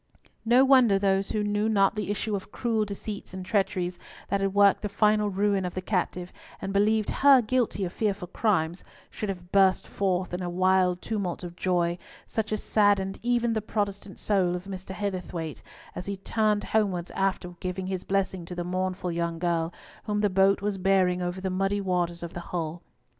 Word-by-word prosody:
No 245 +4 +6
wonder 255 -7 +6
those 195 0 +1
who 215 -2 -1
knew 205 +1 0
not 195 -3 +3
the 210 -2 -3
tissue 205 +1 -1
of 195 +1 -6
cruel 225 -3 0
deceits 200 -1 -7
and 185 -1 -6
treacheries 185 -3 0 0.3
that 200 0 0
had 195 0 -1
worked 200 -1 +5
the 210 - -3
final 210 +1 +2
ruin 200 0 +1
of 180 - -4
the 185 - -2
captive, 180 -2 -2 0.3
and 195 - -4
believed 215 +1 +2
her 275 -1 +8
guilty 235 -4 0
of 175 - -6
fearful 200 -4 -1
crimes, 180 -5 0 0.3
should 210 - -4
have 180 -2 -6
burst 195 -1 +4
forth 185 -2 -1
in 180 - -2
a 175 - -2
wild 185 0 +2
tumult 200 -6 -3
of 175 -1 -7
joy, 175 -1 0 0.3
such 220 -1 -3
as 215 - -2
saddened 200 -2 +2
even 240 -1 +1
the 220 - -1
Protestant 200 -2 -3
soul 185 -4 +1
of 180 - -5
Mr. 190 -1 -7
Heatherthwayte, 180 -5 -4 0.3
as 180 - -7
he 200 -1 -3
turned 210 +1 0
homewards 190 -5 0
after 195 -2 -1
giving 185 +1 -4
his 185 -1 -3
blessing 190 -2 -1
to 180 - -7
the 175 - -3
mournful 185 0 -2
young 170 0 -2
girl, 170 -1 0 0.3
whom 210 -1 0
the 205 -2 +2
boat 195 +1 +3
was 205 -2 -1
bearing 185 -1 +2
over 180 +1 -3
the 190 0 -2
muddy 195 +2 0
waters 175 -3 -1
of 170 - -6
the - - -5
Hull. 170 -1 -3
195 Hz, 190 wpm, -27 LUFS, 180-205 Hz, 0.3 s, her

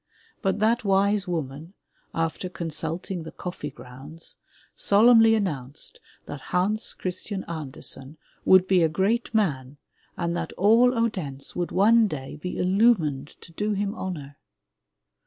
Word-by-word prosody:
But 195 -2 0
that 225 +4 +2
wise 200 0 +2
woman, 160 +1 -5 0.4
after 165 +2 -2
consulting 170 +2 -4
the 160 - -8
coffee 175 -5 -6
grounds, 140 +4 -11 0.4
solemnly 225 +2 +6
announced 155 - -3 0.3
that - - -7
Hans 205 +5 0
Christian 190 +2 -3
Andersen 150 -2 -5 0.3
would 185 0 +6
be 185 -2 +4
a 165 - +3
great 200 +9 0
man 145 - -1 0.4
and 170 -1 -1
that - - -4
all 235 +5 +4
Odense 175 -12 -3
would 175 -1 -2
one 220 +3 +5
day 135 -7 -6
be 180 +4 -5
illumined 180 - +2
to 170 - -14
do 210 +5 -2
him 200 0 -1
honor! 150 -9 -6
180 Hz, 130 wpm, -25 LUFS, 155-210 Hz, 0.4 s, solemnly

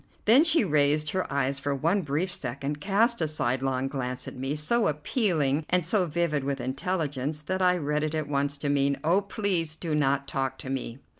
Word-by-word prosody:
Then 245 +8 +7
she 325 -4 +4
raised 150 -3 +2
her 185 -1 -2
eyes 140 0 0
for 140 +1 -2
one 170 +9 +1
brief 160 +4 -2
second, 140 0 -4
cast 215 +5 +2
a 160 - +2
sidelong 135 -2 -1
glance 125 -2 -4
at - - -7
me, 135 +3 -3
so 220 +10 +1
appealing 150 - 0
and 180 -2 +2
so 195 -5 +2
vivid 155 -3 -1
with 140 0 -2
intelligence, 145 0 -2
that 185 +4 -2
I 180 0 +4
read 150 -1 -1
it 155 0 -2
at 155 -2 -2
once 140 0 -1
to 145 0 -3
mean, 140 0 +2
"Oh, 175 +6 +3
please 190 -6 0
do 165 -1 -4
not 140 -1 +1
talk 135 -1 -2
to 130 - -7
me." 130 -3 -4
150 Hz, 200 wpm, -27 LUFS, 140-180 Hz, -, Then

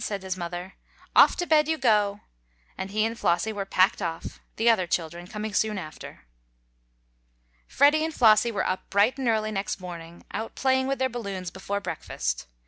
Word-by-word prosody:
said 200 -2 -3
his 190 -1 -3
mother. 175 +1 -6 0.4
"Off - - +7
to 355 - -2
bed 305 -3 +4
you 320 0 0
go!" 210 -6 +2 0.5
and 190 - -5
he 215 +2 +1
and 225 +1 -4
Flossie 175 +6 +1
were 200 -1 -4
"packed 185 +2 +3
off," 165 -2 -5 0.2
the 225 - 0
other 220 -6 +4
children 170 +1 -3
coming 210 +2 -5
soon 215 0 +1
after. 155 - -9 1.4
Freddie 300 +2 +4
and 320 -1 -3
Flossie 220 -1 +5
were 205 - -1
up 185 - -3
bright 215 +7 +2
and 260 - -2
early 215 -1 +1
next 195 -1 -3
morning, 170 -2 -9
out 225 - -5
playing 260 -1 +1
with 275 0 -1
their 260 - +1
balloons 200 -7 -5
before 195 +2 -4
breakfast. - - -4
205 Hz, 180 wpm, -26 LUFS, 185-230 Hz, 1.4 s, Off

